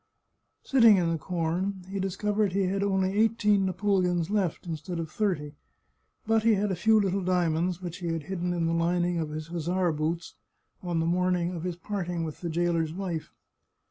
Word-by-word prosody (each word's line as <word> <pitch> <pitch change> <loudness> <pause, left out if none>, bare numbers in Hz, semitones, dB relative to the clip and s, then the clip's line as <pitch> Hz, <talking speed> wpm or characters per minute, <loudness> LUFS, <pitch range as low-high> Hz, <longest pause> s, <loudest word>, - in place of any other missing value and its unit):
Sitting 230 -6 +6
in 170 -2 +1
the 165 - -1
corn, 180 +3 -2
he 195 +1 -4
discovered 205 +1 0
he 195 0 +2
had 195 +2 0
only 190 -1 +1
eighteen 210 -2 +3
napoleons 185 -3 +1
left, 195 -6 0
instead 170 +1 -5
of 165 -1 -4
thirty, 165 -9 -1 0.7
but 225 0 +3
he 225 0 +4
had 205 0 0
a - - 0
few 220 +5 +4
little 195 -1 0
dia 180 -2 +2
monds 175 +3 -1
which 175 -1 -5
he 175 - -5
had 165 -2 -2
hidden 180 +1 -3
in 170 -1 0
the 165 - +1
lining 175 +1 +1
of 160 -2 -2
his 155 +1 -6
hussar 175 +1 0
boots 160 +3 -2 0.5
on 175 -2 -1
the - - 0
morning 180 0 +1
of 170 - -5
his 180 0 -3
parting 175 -2 -3
with 155 -2 -6
the 170 - -3
jailer's 165 -1 0
wife. 175 -4 -4
180 Hz, 190 wpm, -28 LUFS, 165-195 Hz, 0.7 s, Sitting